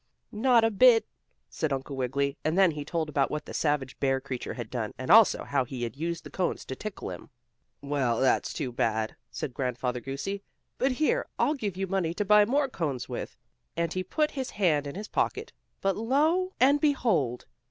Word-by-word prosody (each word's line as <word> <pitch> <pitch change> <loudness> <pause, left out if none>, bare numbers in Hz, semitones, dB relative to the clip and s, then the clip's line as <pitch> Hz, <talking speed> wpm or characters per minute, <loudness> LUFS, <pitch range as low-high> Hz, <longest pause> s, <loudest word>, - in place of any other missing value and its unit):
"Not 235 +1 +4
a 225 - +3
bit," 225 +1 +6 0.4
said 155 - -3
Uncle 135 +1 -3
Wiggily, 135 +2 -1
and 160 +3 0
then 190 -3 +6
he 150 -1 -5
told 160 +1 -2
about 140 -2 +1
what 150 - -4
the - - -9
savage 145 -4 -1
bear 135 -1 +2
creature 130 -2 -5
had 120 -3 -7
done, 115 -4 -3
and 130 - -2
also 225 -1 +7
how 140 -2 0
he 125 0 -6
had 115 -2 -4
used 165 +3 -3
the - - -10
cones 185 - -2
to 130 - -5
tickle 215 +7 -6
him. - - -9 0.5
"Well, 135 -5 0
that's 130 - +2
too 135 -5 -3
bad," 110 -2 -1
said 130 - -5
Grandfather 125 -1 -2
Goosey, 140 +10 -4 0.4
"but 265 +1 +2
here, 390 - +1
I'll 295 - +2
give 210 - -4
you 195 - -1
money 180 -3 -1
to 205 - -1
buy 210 +1 +6
more 275 +5 +2
cones 145 - -3
with," - - -6 0.4
and 170 0 0
he 185 - -2
put 300 - 0
his 265 -3 -4
hand 155 -8 +1
in 140 - -6
his 205 +2 -6
pocket, - - -1 0.3
but 195 -1 +1
lo 310 - +1
and 280 +3 +5
behold! 195 - +1
165 Hz, 200 wpm, -28 LUFS, 135-220 Hz, 0.5 s, also